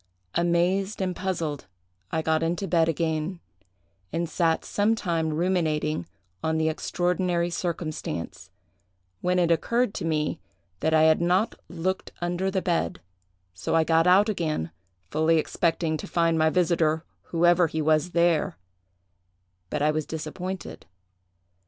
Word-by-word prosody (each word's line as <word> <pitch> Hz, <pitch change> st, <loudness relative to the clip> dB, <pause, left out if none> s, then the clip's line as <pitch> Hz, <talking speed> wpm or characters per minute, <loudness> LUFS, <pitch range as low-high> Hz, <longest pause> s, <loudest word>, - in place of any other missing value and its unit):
Amazed 175 Hz, +4 st, +1 dB
and 185 Hz, -2 st, -1 dB
puzzled 165 Hz, -7 st, -3 dB, 0.4 s
I 160 Hz, -, 0 dB
got 160 Hz, 0 st, +1 dB
into 175 Hz, +4 st, -1 dB
bed 165 Hz, -2 st, +3 dB
again, 160 Hz, +2 st, -1 dB, 0.7 s
and 170 Hz, +2 st, -1 dB
sat 165 Hz, -1 st, +1 dB
some 210 Hz, +2 st, +1 dB
time 165 Hz, -6 st, -1 dB
ruminating 155 Hz, -, 0 dB, 0.4 s
on 160 Hz, 0 st, +1 dB
the 160 Hz, 0 st, +2 dB
extraordinary 175 Hz, +1 st, 0 dB
circumstance, 165 Hz, -, -4 dB, 0.7 s
when 180 Hz, 0 st, +1 dB
it 175 Hz, -2 st, +3 dB
occurred 235 Hz, +6 st, +1 dB
to -, -, -4 dB
me 155 Hz, -2 st, 0 dB, 0.4 s
that 160 Hz, -, +1 dB
I 155 Hz, -, +5 dB
had 160 Hz, +1 st, +5 dB
not 180 Hz, +5 st, +2 dB, 0.2 s
looked 185 Hz, +2 st, -3 dB
under 175 Hz, +2 st, -1 dB
the 190 Hz, -1 st, -1 dB
bed; 175 Hz, -, 0 dB, 0.5 s
so 95 Hz, -, -2 dB
I 165 Hz, -, +5 dB
got 165 Hz, +1 st, +3 dB
out 195 Hz, +4 st, +6 dB
again, 155 Hz, -, -2 dB, 0.4 s
fully 160 Hz, +2 st, +3 dB
expecting 160 Hz, 0 st, 0 dB
to -, -, -7 dB
find 165 Hz, -1 st, +2 dB
my 160 Hz, 0 st, +3 dB
visiter, 165 Hz, -2 st, +1 dB, 0.2 s
whoever 175 Hz, +1 st, +3 dB
he 160 Hz, -, -3 dB
was, 155 Hz, +2 st, +2 dB
there; 170 Hz, -, +2 dB, 1.1 s
but 145 Hz, -, -1 dB
I 150 Hz, -, +4 dB
was 155 Hz, -1 st, -2 dB
disappointed. 175 Hz, +4 st, -6 dB
170 Hz, 135 wpm, -26 LUFS, 160-180 Hz, 1.1 s, out